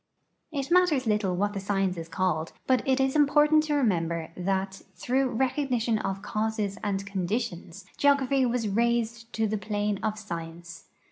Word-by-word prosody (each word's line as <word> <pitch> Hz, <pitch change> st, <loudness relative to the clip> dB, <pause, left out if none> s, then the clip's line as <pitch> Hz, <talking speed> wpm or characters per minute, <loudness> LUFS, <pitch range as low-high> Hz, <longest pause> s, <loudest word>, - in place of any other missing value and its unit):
It 280 Hz, 0 st, -3 dB
matters 345 Hz, -7 st, +4 dB
little 210 Hz, -4 st, +1 dB
what 205 Hz, +3 st, 0 dB
the 200 Hz, -, -3 dB
science 195 Hz, -1 st, 0 dB
is 165 Hz, -1 st, -7 dB
called, 165 Hz, -2 st, -1 dB
but 255 Hz, -1 st, +3 dB
it 265 Hz, 0 st, +3 dB
is 265 Hz, +1 st, +1 dB
important 300 Hz, +1 st, +5 dB
to 300 Hz, -1 st, 0 dB
remember 170 Hz, -, 0 dB
that 190 Hz, +1 st, -2 dB
through 265 Hz, +2 st, +1 dB
recognition 250 Hz, -2 st, 0 dB
of 195 Hz, -1 st, -3 dB
causes 215 Hz, -2 st, -2 dB
and 195 Hz, -2 st, -1 dB
conditions 195 Hz, -1 st, -3 dB
geography 275 Hz, -1 st, +3 dB
was 240 Hz, -2 st, 0 dB
raised 235 Hz, +1 st, 0 dB
to 220 Hz, -, +1 dB
the 215 Hz, 0 st, -1 dB
plane 205 Hz, -1 st, -1 dB
of 215 Hz, -1 st, -1 dB
science. 170 Hz, -3 st, -8 dB
215 Hz, 155 wpm, -27 LUFS, 195-255 Hz, -, important